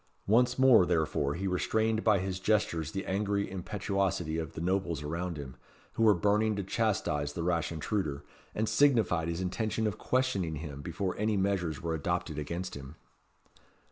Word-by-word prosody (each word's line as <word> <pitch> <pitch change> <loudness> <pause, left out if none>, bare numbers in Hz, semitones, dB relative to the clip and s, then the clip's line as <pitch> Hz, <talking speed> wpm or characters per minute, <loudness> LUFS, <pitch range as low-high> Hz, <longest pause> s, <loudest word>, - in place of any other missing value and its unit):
Once 120 +5 +3
more, 130 -6 +7
therefore, 80 -4 0
he 95 +3 -4
restrained 110 +4 +1
by 110 -3 +4
his 95 0 -3
gestures 90 -6 0
the 95 +2 -4
angry 100 +1 0
impetuosity 95 -3 -2
of 80 0 -5
the - - -6
nobles 85 -3 -1
around 85 +3 -3
him, 70 -3 -7 0.4
who - - -3
were 110 -2 +6
burning 105 +4 +2
to 100 - -2
chastise 95 -9 0
the 85 - -3
rash 85 -1 0
intruder, 80 -4 -2 0.3
and 110 +1 0
signified 110 - +3
his 85 +1 -2
intention 110 +4 -1
of 105 -4 -2
questioning 100 -11 0
him 70 -2 -7
before 90 +5 -3
any 105 0 +1
measures 95 -6 -1
were 85 -1 -1
adopted 80 0 -2
against 85 +5 -4
him. 70 +2 -9
95 Hz, 165 wpm, -30 LUFS, 80-105 Hz, 0.4 s, more